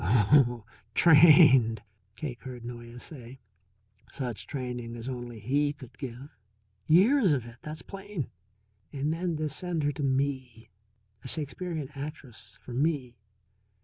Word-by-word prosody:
"Oh, 120 - +4 0.3
trained," 145 - +7 0.3
Cake 125 -4 -6
heard 125 -2 -8
Noyes 120 0 -8
say. 130 -3 -10 0.7
"Such 125 -4 -5
training 125 -4 -5
as 120 +1 -7
only 120 -2 -6
he 145 +7 +1
could 130 -4 -13
give. 135 +1 -8 0.5
Years 200 - +5
of 130 -5 -1
it, 120 0 -12
that's 155 +1 -7
plain. 195 - -6 0.6
And 145 +2 -1
then 170 -1 -2
to 155 0 -1
send 165 +2 -2
her 145 - +2
to 145 - -7
me. 130 -4 -2 0.5
A - - -7
Shakespearean 155 +1 -4
actress 135 -5 -9
for 125 - -8
me! 130 -4 -1
135 Hz, 130 wpm, -28 LUFS, 120-155 Hz, 0.7 s, trained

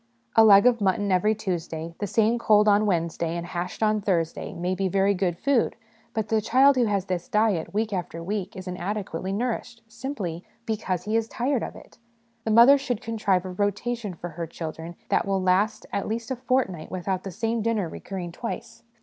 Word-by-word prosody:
A 225 - +8
leg 200 -1 +8
of 240 -3 +4
mutton 200 +1 +1
every 210 +4 +3
Tuesday, 170 -5 -4
the 205 - -2
same 225 +4 +2
cold 210 -2 +4
on 210 +1 +4
Wed 175 -4 +2
nesday, 170 0 -3
and 170 - -4
hashed 175 +4 -4
on 215 -1 +2
Thursday, 175 -5 -1
may 180 +2 -2
be 190 +1 0
very 195 +2 +2
good 180 -3 -1
food; 275 0 +1 0.4
but 220 -1 -1
the 220 -1 +2
child 265 +6 +5
who 250 -2 +3
has 200 -3 0
this 185 +3 -3
diet 210 -7 +1
week 215 +1 -1
after 170 -2 -4
week 200 +1 -3
is 185 0 -8
inadequately 185 0 -3
nourished, 235 +2 -3
simply 220 - -5 0.2
because 200 -5 -2
he 215 +3 -2
is 225 0 +1
28 - - -15
HOME - - +3
EDUCATION - - -2
tired - - -3
of - - -13
it. - - -23 0.5
The - - -1
mother 235 +6 +8
should 250 -5 -3
contrive 210 -5 0
a 185 - -5
rotation 205 +2 -2
for 175 +2 -6
her 165 +1 -5
children 165 +1 -7
that - - +1
will 195 -1 +1
last 190 +4 +1
at 200 - -1
least 230 +3 -3
a - - 0
fortnight 245 -10 -1
without 185 0 -2
the 195 - -5
same 225 +5 -1
dinner 215 -4 0
recurring 180 +1 -6
twice. 230 +4 -6
200 Hz, 210 wpm, -25 LUFS, 180-225 Hz, 0.5 s, A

